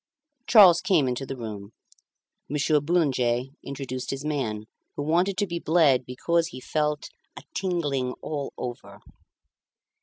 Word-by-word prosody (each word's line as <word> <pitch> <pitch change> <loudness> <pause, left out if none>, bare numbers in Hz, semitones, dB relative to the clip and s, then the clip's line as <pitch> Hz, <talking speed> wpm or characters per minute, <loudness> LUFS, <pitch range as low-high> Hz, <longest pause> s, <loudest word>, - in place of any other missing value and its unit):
Charles 190 -7 +8
came 180 -8 +2
into 125 +2 -3
the 135 - -5
room. 105 -3 -7 0.8
Monsieur 150 +1 +2
Boulanger 135 -6 +1
introduced 130 -2 -5
his 135 +2 -4
man, 125 -9 -2 0.3
who 145 - -3
wanted 175 +5 +1
to 205 - +1
be 170 -2 -4
bled 155 -7 +3
because 165 +6 0
he 170 - -9
felt 150 +2 -2 0.3
"a - - -9
tingling 145 -9 -1
all 145 0 -5
over." 105 -5 -7
145 Hz, 130 wpm, -26 LUFS, 125-170 Hz, 0.8 s, Charles